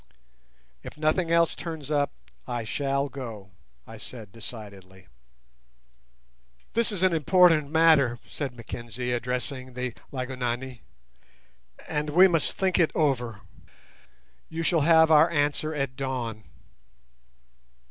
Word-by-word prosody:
"If - - -10
nothing 155 +3 +1
else 170 -1 +3
turns 160 -4 -6
up 145 -1 +1 0.4
I 120 -1 -3
shall 140 +4 -1
go," 115 -8 -8 0.3
I 115 - -11
said 110 -5 -9
decidedly. 100 -4 -10 1.7
"This 230 0 +2
is 190 -3 -2
an 185 -2 +4
important 165 -2 +4
matter," 155 -6 +4
said 135 -4 -5
Mackenzie, 120 +1 -6
addressing 125 +2 -3
the 125 -1 -3 0.2
Lygonani, 125 -2 -4 1.1
"and 150 -1 -2
we 180 +6 +7
must 165 -4 +1
think 190 -2 0
it 165 - +4
over. 125 -8 0 1.1
You 165 +1 -4
shall 165 -1 +2
have 160 +1 +5
our 155 +2 +6
answer 150 0 0
at 140 -4 -3
dawn." 120 -6 -4
140 Hz, 115 wpm, -26 LUFS, 120-160 Hz, 1.7 s, we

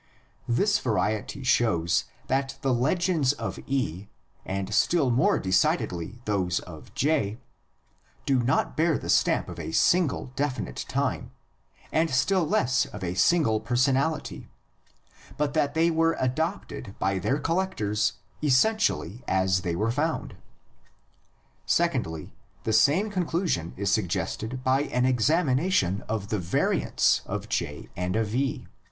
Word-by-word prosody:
This 200 - +2
variety 110 +3 -1
shows 110 -9 +2 0.2
that 135 +1 -1
the 135 -2 +2
legends 155 +2 +1
of - - -5
E, 105 -9 -2 0.4
and 95 +2 -4
still 145 - +3
more 120 +2 +3
decidedly 95 +3 0
those 95 -4 0
of 80 -4 -12
J, 115 -8 +1 0.9
do 135 -3 +2
not 125 +3 0
bear 160 -1 +2
the - - -2
stamp - - +2
of - - -8
a - - -5
single 150 - +2
definite 135 - -3
time - - -1 0.6
and 160 +1 +2
still 160 +6 +2
less 130 -3 +2
of 105 -3 -9
a 90 -1 -2
single 110 - +3
person 125 +3 +2
ality, 150 +4 -2 0.9
but 145 -1 0
that 145 -2 0
they 165 +1 +3
were 165 0 +2
adopted 140 - -3
by 95 0 0
their 130 +10 0
collectors 140 - 0 0.3
essentially 145 - +1
as 95 -1 +2
they 85 -1 -2
were 110 +5 0
found. 155 +6 -2 1.3
Secondly, 80 -2 0 0.3
the 110 - -1
same 160 - +4
conclusion 170 - -1
is 100 0 0
suggested 105 +5 -2
by 130 +1 +3
an 125 -2 0
examination 130 - +2
of 105 -2 -3
the 105 - 0
variants 85 -1 +1
of - - -4
J 75 0 -3
and 90 +1 -2
of 110 -1 -1
E. 135 +2 -1
125 Hz, 130 wpm, -26 LUFS, 100-150 Hz, 1.3 s, same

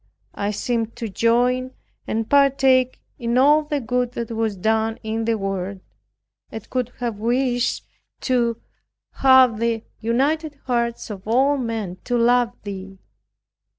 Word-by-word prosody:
I 200 - -2
seemed 230 +1 -2
to 235 -2 -5
join 245 +4 +1 0.3
and 220 0 -2
partake 270 -2 +3 0.2
in 235 0 0
all 295 +4 +5
the 295 -1 -2
good 245 0 -1
that 235 -1 -5
was 225 -2 -1
done 220 +3 0
in 220 +1 -2
the 230 0 +1
world, 195 -1 -3 0.7
and 220 - -8
could 250 -2 -1
have 235 -4 -3
wished 245 +1 0 0.4
to 235 -3 +1 0.5
have 260 -4 +5
the 230 -1 0 0.2
united 290 +7 0
hearts 235 -2 -1
of 200 -1 -9
all 265 +5 +3
men 225 -8 -3
to 245 -1 0
love 240 0 +3
Thee. 195 -1 -7
235 Hz, 135 wpm, -22 LUFS, 220-255 Hz, 0.7 s, all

